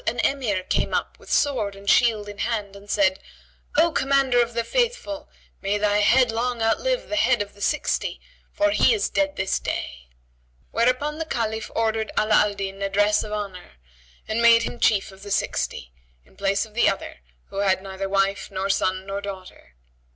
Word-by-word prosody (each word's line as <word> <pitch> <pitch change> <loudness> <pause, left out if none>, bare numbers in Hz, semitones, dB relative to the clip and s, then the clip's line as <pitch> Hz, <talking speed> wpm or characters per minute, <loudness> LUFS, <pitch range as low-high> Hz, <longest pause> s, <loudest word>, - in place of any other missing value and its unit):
an 235 - 0
Emir 230 -9 0
came - - 0
up - - -3
with - - -12
sword 230 -9 +1
and 200 0 -14
shield 215 -2 +3
in 205 0 -9
hand 210 -4 -2
and 200 +1 -14
said, 190 -2 +2 0.6
"O 335 +1 +5
Commander 270 -4 +3
of 235 0 -2
the 235 - +1
Faithful, 480 - -1 0.3
may 200 +1 0
thy 205 0 +2
head 245 +3 +4
long 240 +1 -1
outlive - - 0
the - - -3
Head 260 -5 +3
of 205 0 -4
the 205 - -17
Sixty, 300 - -1 0.3
for 310 0 +2
he 445 - +4
is 415 - -1
dead 290 -1 0
this 190 0 0
day;" - - -5 0.6
whereupon 255 +6 +1
the 325 - -2
Caliph 220 -5 -2
ordered 220 -1 0
Ala 215 0 +2
al 210 -1 +4
Din 195 0 -5
a 195 - 0
dress 205 +1 +2
of 215 - -8
honour 200 -4 -5 0.5
and 220 +2 -1
made 230 0 +6
him 240 - -5
Chief 200 -2 +2
of 190 0 -16
the 205 - -9
Sixty, - - -2 0.3
in - - -24
place 200 +1 0
of 215 - -18
the 240 - +4
other 195 - -5 0.3
who - - -9
had 195 -1 +1
neither 195 0 -5
wife 195 0 0
nor 195 0 -1
son 185 0 0
nor 195 +1 -4
daughter. 185 - -9
210 Hz, 190 wpm, -24 LUFS, 195-245 Hz, 0.6 s, made